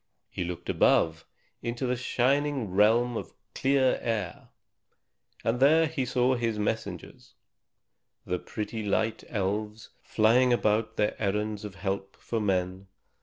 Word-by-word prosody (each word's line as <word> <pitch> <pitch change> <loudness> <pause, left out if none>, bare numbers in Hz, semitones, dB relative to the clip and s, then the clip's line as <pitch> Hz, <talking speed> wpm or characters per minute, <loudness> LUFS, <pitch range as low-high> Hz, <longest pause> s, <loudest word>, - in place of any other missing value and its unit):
He - - -3
looked 85 0 -6
above, 80 0 +2 0.3
into 120 +2 -3
the 125 0 0
shining 130 -1 0
realm 115 +5 +3
of - - -6 0.2
clear 135 -1 +2
air. 105 -7 -3 1.0
And 115 +2 0
there 155 +4 +5
he 150 -4 -2
saw 125 +1 +2
his 115 -3 -1
messengers, 105 -4 -4 0.9
the 90 0 -2
pretty 110 +1 -5
little 100 -2 +1
Light 110 0 -3
Elves, 105 +1 -3
flying 120 +4 +3
about 110 -2 +2
upon - - -27
their 105 +1 -1
errands 105 +1 -1
of 105 -2 -7
help 95 0 -4
for 115 - -3
men. 95 -2 -1
110 Hz, 135 wpm, -28 LUFS, 100-125 Hz, 1.0 s, there